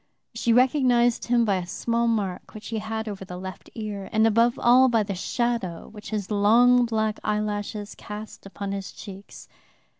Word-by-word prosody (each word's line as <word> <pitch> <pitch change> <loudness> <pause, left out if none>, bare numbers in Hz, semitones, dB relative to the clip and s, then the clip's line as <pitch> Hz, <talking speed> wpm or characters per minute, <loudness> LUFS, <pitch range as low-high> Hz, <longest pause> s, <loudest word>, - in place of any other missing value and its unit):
She 230 0 0
recognized 245 -1 +3
him 240 -1 +3
by 200 -3 +2
a 180 -1 -5
small 235 +5 -1
mark 205 -5 -2
which 210 -1 -8
he 225 -1 -2
had 220 +1 -4
over 200 -2 -5
the 180 -1 -8
left 185 0 -8
ear, 210 -3 -5
and 220 0 +3
above 230 +2 +3
all 255 +2 +5
by 225 -3 +2
the 200 -1 -4
shadow 210 -3 -2
which 210 0 -10
his 210 -2 -4
long 240 +4 +5
black 220 -1 -1
eyelashes 210 0 -2
cast 210 -1 -9
upon 200 0 -6
his 195 -1 -5
cheeks. 195 -1 -11
215 Hz, 175 wpm, -25 LUFS, 200-235 Hz, -, all